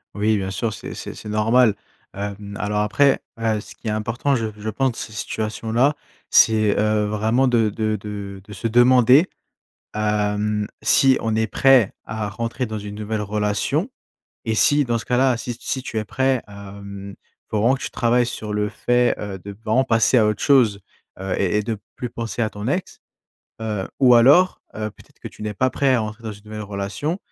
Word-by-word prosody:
Oui 105 +1 +1
bien 95 -1 -3
sûr, 110 +2 -2
c'est - - -8
c'est - - -7
c'est 105 - -9
normal. 110 +2 +3 0.4
Hem, 100 0 -6
alors 105 0 -1
après, 130 +7 +2 0.2
heu, 110 -2 0
ce - - -13
qui - - -10
est - - 0
important 115 +6 -1
je 115 -2 -1
je 105 +1 -5
pense 125 +2 -1
ces 110 - -6
situations-là, 110 +6 -1 0.3
c'est, 110 -2 +4
heu, 105 0 +1
vraiment 110 +5 +1
de 115 -3 +2
de 110 +1 -1
de 100 -1 -7
de 105 - -11
se 105 +4 -3
demander, 125 - +5 0.7
hem, 105 0 0
si 135 -1 +6
on 110 -1 -1
est 110 0 +1
prêt 135 -6 +4
à 110 -2 -4
rentrer 115 +5 -3
dans 110 -2 -5
une 105 0 -7
nouvelle 105 0 -3
relation 105 - -1 0.6
et 110 -1 0
si- 145 +5 +5
dans 120 -1 0
ce - - -6
cas-là- 125 0 +2
si 120 0 -5
si 130 - -2
tu 110 - -5
es 110 - -1
prêt, 130 +2 0
hem, 100 0 -10 0.3
faut 105 - -1
vraiment 120 +5 +3
que 135 - -10
tu - - -3
travailles 120 +1 +2
sur 110 -3 -5
le 105 0 0
fait, 120 +3 +1
heu, 100 -2 -6
de 100 - -7
vraiment 115 +5 +3
passer 115 0 +3
à 110 - +5
autre 105 -1 -1
chose. 120 -8 +4 0.4
Heu 95 0 -3
et 100 +1 +1
et 105 - +2
de 110 0 -3 0.2
plus 125 - -4
penser 115 0 -4
à 110 - +1
ton 105 +2 -7
ex. 180 +6 -3 0.6
Heu, 105 -4 -3
ou 125 -2 +7
alors, 145 +11 +5
heu, 110 0 -4
peut-être - - -21
que - - -8
tu - - -13
n'es 105 0 -4
pas 130 +5 +1
prêt 135 -1 +2
à 120 - +1
entrer 110 +2 -7
dans 110 - -4
une 105 0 -15
nouvelle 105 0 -7
relation 105 - -4
110 Hz, 200 wpm, -21 LUFS, 105-120 Hz, 0.7 s, ou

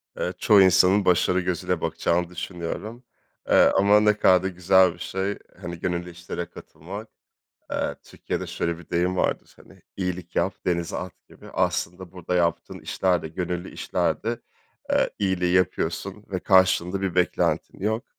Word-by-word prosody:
Evet, 90 0 -4
çoğu 105 -2 +6
insanın 95 +2 +5
başarı 90 +1 +3
gözüyle 90 -2 -2
bakacağını 85 0 0
düşünüyorum, 90 +7 -6 0.5
eee, - - +6
ama 100 +2 +5
ne 105 0 +4
kadar 90 -3 +5
da - - 0
güzel 90 0 +4
bir 85 - -17
şey, 95 +3 -3 0.2
hani, 85 -1 -6
gönüllü 90 0 -2
işlere 85 0 -6
katılmak. 100 +7 -10 0.6
Eee, - - -1
Türkiye'de - - -5
şöyle 85 0 -2
bir 85 - -15
deyim 90 +2 +1
vardır, - - -1
hani, - - -19 0.2
iyilik 90 -2 -4
yap, 95 - +1
denize 85 -2 -1
at, 90 0 -6 0.2
gibi. - - -14
Aslında 90 0 -1
burada 90 -1 -4
yaptığın 85 -1 0
işler 90 -2 0
de - - -5
gönüllü 90 +2 -4
işler - - -1
de, 115 +1 -2 0.5
eee, - - +3
iyiliği 90 -3 +1
yapıyorsun 90 +2 0
ve 95 - -1
karşılığında 95 0 +3
bir 95 -3 -2
beklentin 90 -1 0
yok. 110 +4 -1
90 Hz, 155 wpm, -25 LUFS, 85-95 Hz, 0.6 s, çoğu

